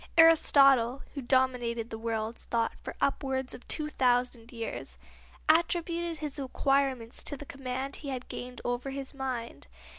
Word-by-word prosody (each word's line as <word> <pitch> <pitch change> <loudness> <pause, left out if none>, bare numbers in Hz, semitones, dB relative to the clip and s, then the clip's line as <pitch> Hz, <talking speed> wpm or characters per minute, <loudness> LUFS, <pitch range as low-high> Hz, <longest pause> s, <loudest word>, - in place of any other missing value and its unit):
Aristotle, 275 -6 +6
who 280 - -4
dominated 245 -3 +1
the 220 - -4
world's 225 0 -3
thought 230 -1 0
for - - -7
upwards 265 -2 0
of 245 - -11
two 305 -1 -1
thousand 245 -4 +1
years, 230 -2 -6 0.5
attributed 340 +1 +2
his 300 -2 -4
acquirements 270 -3 0
to 285 - -4
the 290 - -9
command 265 0 -4
he 285 - -7
had 255 -2 -4
gained 250 0 -7
over 245 +2 -1
his 270 0 -6
mind. 255 -4 -5
260 Hz, 145 wpm, -30 LUFS, 240-280 Hz, 0.5 s, Aristotle